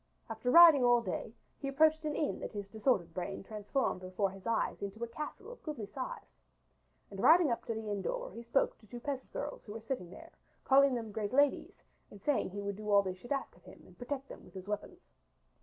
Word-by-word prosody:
After 225 +3 -2
riding 325 -2 +9
all 240 -1 +5
day, 225 - -4 0.3
he 275 - -4
approached 310 +3 +3
an 300 -1 -1
inn 300 - -1
that - - -6
his 205 -2 -5
disordered 205 -5 0
brain 190 +2 -4
transformed 210 +1 -2
before 185 +1 -1
his 195 +1 -10
eyes 230 -1 0
into 200 +3 -5
a - - -2
castle 300 - -7
of - - -12
goodly 295 -9 -5
size, 255 +5 -7 0.7
and - - -8
riding 330 -4 +6
up 235 - -2
to 230 - -2
the 220 -1 -5
inn 205 -1 -2
door - - -3
he 235 - -7
spoke 235 +4 +1
to 215 - -20
two 240 +4 -8
peasant 270 +1 -5
girls - - -5
who 205 - -9
were 225 - -6
sitting 225 -10 -3
there, 185 - -12 0.3
calling 275 -1 +5
them 225 -3 -4
great 210 +1 -3
ladies 285 +1 +2 0.3
and 205 - -13
saying 285 +7 +1
that 185 - -11
he 205 - -4
would 200 -1 -3
do 210 0 -6
all 200 -1 +6
that 190 - -2
they - - -8
should 240 +8 -14
ask 275 -1 -2
of - - -21
him - - -14
and - - -17
protect 270 +2 -4
them - - -11
with - - -17
his 190 0 -8
weapons. 210 - -5
230 Hz, 240 wpm, -33 LUFS, 205-280 Hz, 0.7 s, riding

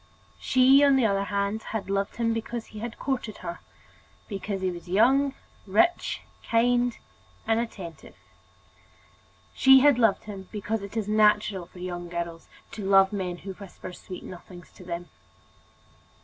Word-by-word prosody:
She, 265 +2 +5
on 280 -1 +6
the 260 -3 +3
other 200 -2 +1
hand, 200 +2 -1
had 220 -3 -5
loved 195 0 -1
him 230 -1 0
because 225 +1 -4
he 215 +2 -6
courted 250 -6 -3
her, 170 0 -5 0.7
because 200 -1 -4
he 185 -1 0
was 175 0 -10
young, 265 +8 +3 0.3
rich, 220 - +2 0.3
kind, 245 +1 +2 0.5
and 225 0 +2
attentive. 190 -8 -7 1.4
She 265 0 +7
had 285 -3 +5
loved 225 -4 +3
him 195 -3 -9
because 210 +1 -3
it 200 +3 -7
is 215 -2 -1
natural 210 -3 +3
for 180 - -17
young 175 -1 -5
girls 170 -1 -5 0.2
to 210 - -7
love 195 0 +5
men 185 -3 -3
who 195 +2 -7
whisper 185 -1 -10
sweet 180 0 -9
nothings 175 -1 -11
to - - -14
them. 175 0 -6
205 Hz, 150 wpm, -26 LUFS, 185-230 Hz, 1.4 s, She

